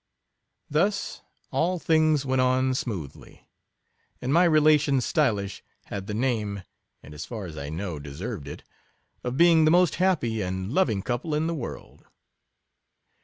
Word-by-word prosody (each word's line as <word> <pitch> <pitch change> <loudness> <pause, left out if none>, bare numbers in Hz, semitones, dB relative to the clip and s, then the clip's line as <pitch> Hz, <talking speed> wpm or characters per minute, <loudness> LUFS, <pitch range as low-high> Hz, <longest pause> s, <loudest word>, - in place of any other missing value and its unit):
Thus, 195 +8 0 0.3
all 180 +3 +1
things 155 -3 +2
went 130 -1 +1
on 130 +1 +2
smoothly; 95 - -6 0.7
and 130 +3 -1
my 175 +2 +5
relations 150 -4 +4
Stylish 105 - 0 0.2
had 100 -1 -6
the 105 - -3
name, 110 -5 -1 0.4
and, 75 - -12
as 75 +2 -6
far 110 -5 -6
as 80 -3 -8
I 70 -1 -6
know, 85 0 -4
deserved 75 - -6
it, - - -8 0.6
of 125 +1 -3
being 170 -1 +6
the 155 - +5
most 180 +2 +4
happy 135 - +1
and 95 +3 -3
loving 115 - +1
couple 135 +5 -2
in 155 +1 0
the 165 - -1
world. 140 -8 -8
130 Hz, 145 wpm, -26 LUFS, 100-155 Hz, 0.7 s, being